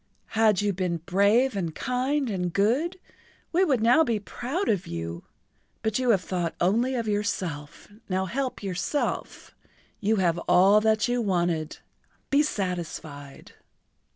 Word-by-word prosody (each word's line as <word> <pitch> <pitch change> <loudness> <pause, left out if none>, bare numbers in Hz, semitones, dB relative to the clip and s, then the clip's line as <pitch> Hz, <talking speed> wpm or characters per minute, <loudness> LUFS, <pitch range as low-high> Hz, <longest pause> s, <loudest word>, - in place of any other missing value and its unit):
Had 215 -3 +3
you 205 -1 +1
been 180 -2 -1
brave 200 +8 +2
and 170 -5 -3
kind 260 +3 -1
and 180 -3 -2
good 265 - +1 0.5
we 360 +3 +3
would 270 -10 +2
now 245 +8 +5
be 230 -7 0
proud 265 - -4
of 200 -5 0
you. 85 0 -5 0.6
But 220 +2 0
you 255 -1 0
have 195 -5 +3
thought 175 -3 -2
only 230 +9 +2
of 230 -2 -2
yourself, 185 -8 -3 0.2
now 190 0 0
help 260 +4 -3
yourself. 195 - -3 0.5
You 215 +1 +1
have 175 -4 +1
all 190 +4 +6
that 220 0 +2
you 245 0 0
wanted—be 175 - -2
satisfied." 170 - -5
205 Hz, 135 wpm, -26 LUFS, 180-245 Hz, 0.6 s, all